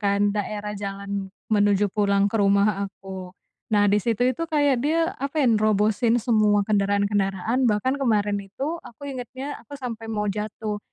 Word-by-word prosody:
kan 200 Hz, 0 st, +2 dB
daerah 210 Hz, 0 st, -3 dB
jalan 200 Hz, -1 st, -5 dB, 0.2 s
menuju 205 Hz, -1 st, +3 dB
pulang 200 Hz, -1 st, +2 dB
ke 225 Hz, -, -2 dB
rumah 200 Hz, 0 st, +3 dB
aku, 190 Hz, -1 st, -9 dB, 0.4 s
nah 205 Hz, -1 st, +4 dB
disitu 220 Hz, +4 st, +2 dB
itu 255 Hz, +6 st, 0 dB
kayak 290 Hz, -5 st, +2 dB
dia 330 Hz, +2 st, +1 dB
apa 280 Hz, +3 st, -2 dB
ya -, -, +3 dB
nerobosin 215 Hz, +2 st, +2 dB
semua 215 Hz, -3 st, +3 dB
kendaraan-kendaraan 200 Hz, +2 st, +1 dB
bahkan 210 Hz, +6 st, +1 dB
kemarin 210 Hz, -5 st, +1 dB
itu 275 Hz, -, -4 dB
aku 260 Hz, +5 st, -11 dB
ingetnya 260 Hz, +2 st, -6 dB
aku 290 Hz, -, -11 dB
sampai 230 Hz, -3 st, -6 dB
mau 210 Hz, -1 st, -1 dB
jatuh, 210 Hz, +1 st, -4 dB
210 Hz, 150 wpm, -24 LUFS, 200-240 Hz, 0.4 s, nah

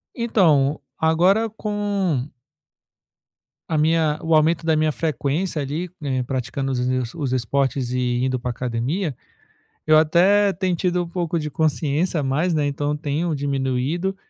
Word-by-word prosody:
Então, 160 Hz, -, +2 dB, 0.2 s
agora 180 Hz, +8 st, +3 dB
com 205 Hz, -, -2 dB, 1.4 s
a 160 Hz, -, 0 dB
minha 155 Hz, -1 st, +2 dB
o 160 Hz, -, +1 dB
aumento 160 Hz, +2 st, +3 dB
da 160 Hz, -1 st, +2 dB
minha 155 Hz, 0 st, +2 dB
frequência 155 Hz, +2 st, -1 dB
ali, 155 Hz, +6 st, -3 dB
eh, 130 Hz, -3 st, -1 dB
praticando 130 Hz, +2 st, -3 dB
os 125 Hz, -1 st, -1 dB
os 145 Hz, -6 st, -3 dB
esportes 130 Hz, 0 st, 0 dB
e 125 Hz, 0 st, 0 dB
indo 130 Hz, -1 st, 0 dB
para 125 Hz, +1 st, -4 dB
a -, -, 0 dB
academia, 130 Hz, -, -2 dB, 0.7 s
eu 155 Hz, 0 st, +6 dB
até 190 Hz, +6 st, +4 dB
tenho 185 Hz, 0 st, 0 dB
tido 180 Hz, +1 st, 0 dB
um -, -, -9 dB
pouco 170 Hz, -1 st, -2 dB
de 150 Hz, -1 st, -4 dB
consciência 155 Hz, +2 st, 0 dB
a -, -, -2 dB
mais, 155 Hz, +6 st, 0 dB
né, 150 Hz, -2 st, +1 dB
então 145 Hz, +1 st, -1 dB
tenho 155 Hz, +2 st, -2 dB
diminuído. 140 Hz, +6 st, -1 dB
155 Hz, 145 wpm, -22 LUFS, 135-175 Hz, 1.4 s, eu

